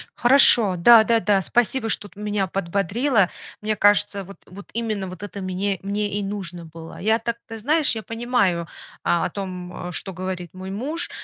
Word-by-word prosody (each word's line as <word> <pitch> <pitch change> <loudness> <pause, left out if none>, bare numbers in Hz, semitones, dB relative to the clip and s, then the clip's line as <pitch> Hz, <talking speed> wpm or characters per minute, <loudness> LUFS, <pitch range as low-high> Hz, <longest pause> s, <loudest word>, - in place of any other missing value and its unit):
Хорошо, 240 -6 +6
да, 225 +6 +7
да, 230 +1 +2
да, 205 -3 +2
спасибо, 240 +4 +1
что 205 -2 -2
ты - - -17
меня 210 -2 -1
подбодрила. 195 +4 0 0.3
Мне 215 0 -1
кажется, 205 -1 +2
вот 195 +2 -13
вот 200 +2 -13
именно 215 -4 -3
вот 185 +2 -9
это 200 0 -7
мне 190 +1 -2
мне 205 +1 -2
и 205 - -3
нужно 185 -4 -5
было. 165 0 -11
Я 220 +3 +1
так, 235 0 -3
ты 225 -1 -8
знаешь, 295 +3 +2
я 220 - -5
понимаю, 225 -6 0
э, - - -11 0.4
о 175 - +1
том, 180 -2 -7
э, - - -7
что 190 +2 -4
говорит 185 -2 -6
мой 185 +1 -8
муж, 290 - -2
200 Hz, 185 wpm, -22 LUFS, 185-225 Hz, 0.4 s, да